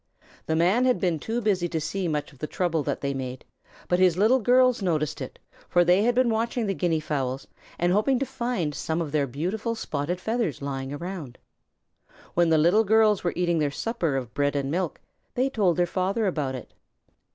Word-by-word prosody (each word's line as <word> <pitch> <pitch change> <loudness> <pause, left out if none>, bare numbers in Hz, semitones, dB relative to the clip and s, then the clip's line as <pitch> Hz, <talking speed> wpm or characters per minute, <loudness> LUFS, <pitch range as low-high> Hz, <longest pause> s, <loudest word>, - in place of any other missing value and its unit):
The 160 - +1
Man 185 +10 +3
had 250 -1 +2
been 175 -5 0
too 230 +9 -2
busy 190 -5 +1
to 160 - -1
see 180 +4 -2
much 150 -1 -3
of 135 - -20
the 155 - -3
trouble 165 -3 0
that - - -3
they 140 0 -1
made, 130 -1 -6 0.4
but 180 - +2
his 180 -2 +4
Little 225 +7 +4
Girls 250 +1 +4
noticed 155 -5 -1
it, 130 - -7 0.3
for 175 0 +4
they 180 +3 +4
had 240 +2 +2
been 250 -2 +3
watching 230 +1 -1
the 195 - 0
Guinea 170 -4 0
fowls 135 -3 -3 0.3
and 175 +1 +2
hoping 230 +6 +2
to 275 - -1
find 240 - -2
some 160 +3 -2
of 160 -4 -3
their 145 -2 +1
beautiful 190 - -3
spotted 160 -3 -3
feathers 220 - -1
lying 135 -1 -4
around. 155 -4 -6 1.0
When 175 -1 +3
the 160 - +4
Little 175 +8 +4
Girls 215 -1 +3
were 175 - 0
eating 175 -2 +1
their 150 -2 +1
supper 165 - -2
of 125 -3 -4
bread 145 0 0
and 140 -1 -1
milk, 175 0 -2 0.4
they 260 +2 +1
told 190 -8 +2
their 175 - +3
father 190 +5 -1
about 150 -8 -1
it. 125 - -9
175 Hz, 205 wpm, -26 LUFS, 150-220 Hz, 1.0 s, his